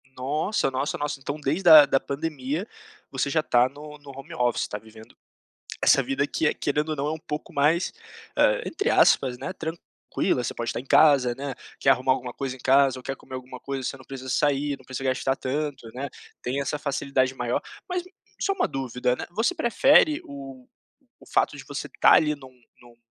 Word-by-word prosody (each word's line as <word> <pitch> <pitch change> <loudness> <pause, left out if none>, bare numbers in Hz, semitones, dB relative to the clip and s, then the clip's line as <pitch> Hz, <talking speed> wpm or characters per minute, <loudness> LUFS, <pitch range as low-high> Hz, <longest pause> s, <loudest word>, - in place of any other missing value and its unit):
Nossa, 145 +6 0
nossa, 135 +2 -2
nossa, 145 -1 -3
então 145 +2 -5
desde 150 +6 -1
da 155 -4 +10
da 135 -1 +2
pandemia 150 - -3 0.4
você 135 +1 -1
já 155 +2 +2
tá 125 -3 +3
no 150 +2 -11
no 145 -1 -14
home 140 +5 -9
office, 125 -6 0
tá 105 - -5
vivendo 110 +1 -15 0.7
essa 135 - +6
vida 135 +2 0
que 160 - 0
é, - - +2
querendo 150 +2 -1
ou 155 - -1
não, 140 0 -2
é - - 0
um 160 - -3
pouco 150 -1 -6
mais, 155 +4 +2 0.4
ah, - - +3
entre 405 +8 -1
aspas, 125 -2 +4
né, - - -4
tranquila, 160 -6 -3
você - - -3
pode 120 0 -4
estar - - -3
em 125 - -9
casa, 135 -4 +5
né, 135 0 -5 0.2
quer - - +2
arrumar 130 0 +3
alguma 125 -1 -5
coisa 135 -2 -4
em - - -16
casa 135 0 +3
ou - - -14
quer 135 - -4
comer 130 - -14
alguma 130 0 -8
coisa, 135 0 -4 0.3
você 130 -1 -7
sair, 145 +1 +1
não 130 - -20
precisa 130 +1 -6
gastar 135 +1 0
tanto, 140 -1 -3
né, 135 +3 -4 0.3
tem 130 +3 -2
essa 145 +2 -2
facilidade 140 -2 0
maior, 120 -2 -1 0.3
mas 360 -1 -1 0.4
só 395 - +1
uma - - 0
dúvida, 125 -2 -1
né, - - -6
você 225 - +1
prefere 295 +2 +4
o 135 -2 -10 0.5
o - - -17
fato - - +2
de - - -9
você - - -5
estar - - +4
ali 150 -1 +5
em - - -6
um - - -9
em 120 -1 -25
um 120 -1 -18
135 Hz, 205 wpm, -25 LUFS, 130-150 Hz, 0.7 s, da